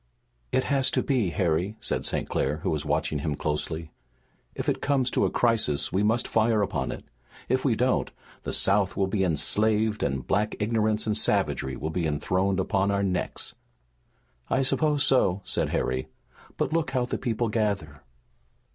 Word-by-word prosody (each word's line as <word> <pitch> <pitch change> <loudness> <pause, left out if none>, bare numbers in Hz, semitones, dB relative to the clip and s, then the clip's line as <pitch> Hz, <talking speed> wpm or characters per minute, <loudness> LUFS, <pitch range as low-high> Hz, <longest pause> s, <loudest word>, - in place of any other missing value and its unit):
"It 130 - +2
has 135 -2 +2
to - - +2
be, 125 -9 +1
Harry," 90 +4 0
said 110 -1 -2
St. - - -1
Clair, 75 +3 -1
who - - 0
was 75 -2 -1
watching 75 0 -1
him 75 0 -2
closely. 80 +2 -3 0.6
"If - - -4
it - - 0
comes 135 -3 +1
to - - +2
a - - +2
crisis 105 -12 +1
we 95 - +2
must 110 +3 +2
fire 110 -1 +2
upon - - -2
it. - - -8 0.4
If 130 +1 +1
we 125 -5 +2
don't, 125 +3 +1 0.3
the - - -4
South 100 0 +2
will 95 - +2
be 95 +1 0
enslaved 105 +6 +1
and 65 -3 -1
black 105 +1 0
ignorance 110 0 +1
and 105 -1 0
savagery 65 -9 0
will 80 +3 -4
be 85 -1 -1
enthroned 95 +6 0
upon 95 +1 +1
our 100 0 +1
necks." 90 -2 -3 1.0
"I 130 +1 +2
suppose 150 +1 +2
so," 100 -8 +3
said - - -1
Harry. 65 0 -1 0.5
"But - - -1
look 165 -3 +1
how 130 -2 0
the - - -3
people 115 -1 -1
gather!" 100 -9 -2
105 Hz, 175 wpm, -26 LUFS, 80-115 Hz, 1.0 s, so